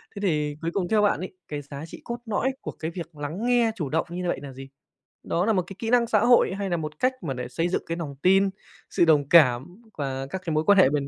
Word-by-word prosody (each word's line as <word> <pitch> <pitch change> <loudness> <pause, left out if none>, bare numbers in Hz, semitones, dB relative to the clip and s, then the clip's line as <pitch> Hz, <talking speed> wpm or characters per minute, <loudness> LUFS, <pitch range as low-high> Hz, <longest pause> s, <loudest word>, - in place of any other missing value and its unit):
Thế 200 - -5
thì 150 -6 0
cuối 165 +1 -2
cùng 185 -3 -1
theo 215 -1 +3
bạn 205 -7 +2
ấy, 185 - -6
cái 150 -1 -4
giá 140 +1 -8
trị - - -11
cốt 235 - -4
lõi 230 +4 0
của - - -5
cái 160 +1 -5
việc 165 -2 -8
lắng 155 +9 -4
nghe 240 -2 +3
chủ 155 -10 -3
động 160 +1 0
như 180 +1 -4
vậy 175 - -1
nà 135 -2 -8
gì? 135 +1 -10 0.5
Đó 175 +2 0
nà 220 - +3
một 185 - +1
cái 195 - -9
kỹ 225 - -3
năng 240 -1 +4
xã - - +3
hội 240 -5 +4
hay 195 -1 -2
nà 175 - 0
một 155 -1 -6
cách 255 +1 +2
mà 145 -5 -2
để 125 -1 -5
xây 165 +7 -1
dựng - - -1
cái 165 - -3
nòng 150 -5 -5
tin, 195 +2 +5 0.4
sự - - +3
đồng 145 -4 +3
cảm 155 - +4
quà 135 -2 -4
các 190 - -4
cái 165 - -1
mối 155 - +2
quan 200 0 +6
hệ 185 - +7
bền 140 -1 -1
170 Hz, 280 wpm, -25 LUFS, 145-200 Hz, 0.5 s, hệ